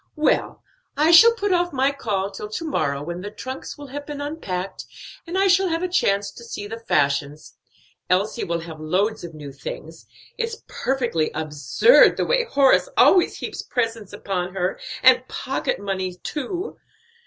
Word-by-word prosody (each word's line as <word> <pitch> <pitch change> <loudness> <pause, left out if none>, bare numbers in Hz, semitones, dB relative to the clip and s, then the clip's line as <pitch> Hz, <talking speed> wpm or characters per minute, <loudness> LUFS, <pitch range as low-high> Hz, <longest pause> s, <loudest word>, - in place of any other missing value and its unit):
"Well, 305 -1 0 0.3
I 310 +3 +4
shall 460 +8 +8
put 410 -3 -1
off 350 -1 +2
my 270 0 +2
call 200 -8 -2
till 210 +2 -7
to 330 +10 -4
morrow, 150 - -1
when 175 +3 -5
the 205 - -5
trunks 260 +5 -7
will 290 - -9
have 290 +2 -6
been 295 -1 -6
unpacked, 195 - -5 0.4
and 350 +3 -3
I 390 - +3
shall 380 0 +4
have 330 0 -1
a - - +1
chance 200 - +1
to 235 - -13
see 215 -3 -6
the 225 +2 -7
fashions. 145 -7 -1 0.5
Elsie 195 +5 +1
will 170 0 -2
have 165 -1 -9
loads 190 +8 0
of 165 -2 -8
new 145 -2 -8
things; 155 +4 -9 0.3
it's 460 -1 -3
perfectly 240 -12 -1
absurd 155 - +4
the - - 0
way - - +2
Horace 280 - +3 0.5
heaps - - -5
presents 230 -4 -3
upon 190 -3 -4
her, 185 0 -1 0.2
and 255 0 +6
pocket 265 +1 -3
money 190 -2 -3
too. 310 - -5
215 Hz, 165 wpm, -23 LUFS, 180-300 Hz, 0.5 s, shall